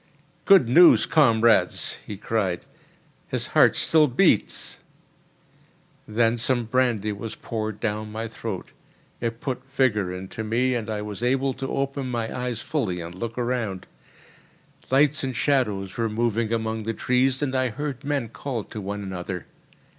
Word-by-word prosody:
"Good 195 - +6
news, 170 +9 +7
comrades!" 115 -7 +3
he 105 - -7
cried. 95 -4 -1 0.6
"His - - -2
heart - - +5
still 155 -2 +4
beats!" 130 - +1 1.3
Then 115 +2 +2
some 120 +1 +1
brandy 115 -3 +1
was 105 +2 -6
poured 110 -2 -4
down 105 -1 -3
my 110 +1 -4
throat; 110 -4 -6 0.5
it 115 -1 -3
put 130 -2 -3
vigour 105 -9 +1
into 95 +4 -6
me, 120 +4 +1
and 115 -2 -3
I 105 -1 -3
was 105 0 -6
able 135 +2 +1
to 135 +1 -5
open 135 -1 -2
my 115 -2 -3
eyes 125 -2 -3
fully 110 - -2
and 85 0 -7
look 115 +5 -6
around. 120 -6 -2 1.0
Lights 145 +3 +3
and 130 -2 -3
shadows 105 -9 0
were 115 -1 0
moving 115 0 0
among 110 -1 -1
the 115 +1 -3
trees, 130 +3 +1
and 135 -2 -1
I 130 -1 +1
heard 140 +3 -5
men 140 -5 -1
call 115 +1 -4
to 105 - -8
one 100 +1 -4
another. 95 -1 -5
115 Hz, 150 wpm, -24 LUFS, 105-130 Hz, 1.3 s, news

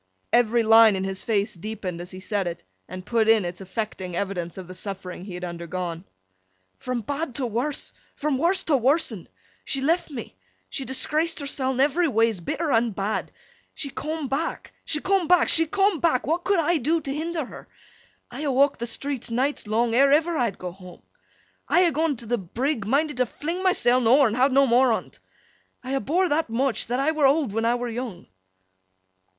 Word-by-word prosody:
Every 235 -1 +4
line 225 -1 +7
in 190 - -2
his 190 0 -4
face 215 -1 0
deepened 185 -2 -6
as 175 - -8
he 185 - -9
said 200 -1 -2
it, 170 -1 -6 0.2
and 185 0 -8
put 225 -2 +1
in 220 -4 +4
its 175 +2 -6
affecting 190 -2 -5
evidence 180 -2 -3
of 185 -2 -8
the 185 - -9
suffering 185 -2 -6
he 190 -3 -7
had 180 - -7
undergone. 170 0 -5 0.7
'From 250 -2 -3
bad 285 +3 -4
to 270 - -1
worse, 245 +6 -2 0.2
from 285 -3 -1
worse 370 +5 +3
to 295 -4 +2
worsen. 255 - +1 0.4
She 275 - -2
left 325 +6 +1
me. 235 - -8 0.4
She 270 - -3
disgraced 305 +6 0
herseln 265 -3 -1
everyways, 265 - +2
bitter 315 - -2
and 225 -3 +2
bad. 205 +2 -2 0.4
She 280 - -5
coom 310 0 -4
back, 280 +6 -3
she 300 - -1
coom 385 -3 +1
back, 360 0 +4
she 325 0 +3
coom 390 0 +2
back. 315 -6 +1
What 335 +4 -1
could 395 0 +3
I 335 +1 +2
do 310 +5 +1
t' 280 -3 -4
hinder 320 0 -3
her? - - -12 0.6
I 250 +4 -7
ha' 290 -2 0
walked 275 +2 +3
the 235 - -2
streets 265 +1 -2
nights 255 +1 -1
long, 225 +2 +1
ere 275 +3 +5
ever 325 +3 +3
I'd 235 - 0
go 180 -1 -6
home. 180 0 -14 0.6
I 360 - +4
ha' 335 - 0
gone 315 -1 +1
t' 235 - -8
th' 215 -7 -3
brigg, 245 -4 -1
minded 290 +3 +1
to 250 -1 +1
fling 335 +10 -4
myseln 255 -10 +3
ower, 270 +4 +6
and 220 - -2
ha' 260 +3 +4
no 275 +1 +4
more 250 0 +4
on't. - - -5 0.6
I 260 +1 -4
ha' 270 - +1
bore 360 +6 +1
that 315 -4 0
much, 255 +2 0
that 245 +2 -1
I 285 +3 +2
were 305 -3 +3
owd 280 -4 +2
when 225 +2 -1
I 235 +1 +3
were 245 0 -3
young. 230 -6 -6
250 Hz, 200 wpm, -24 LUFS, 215-300 Hz, 0.7 s, line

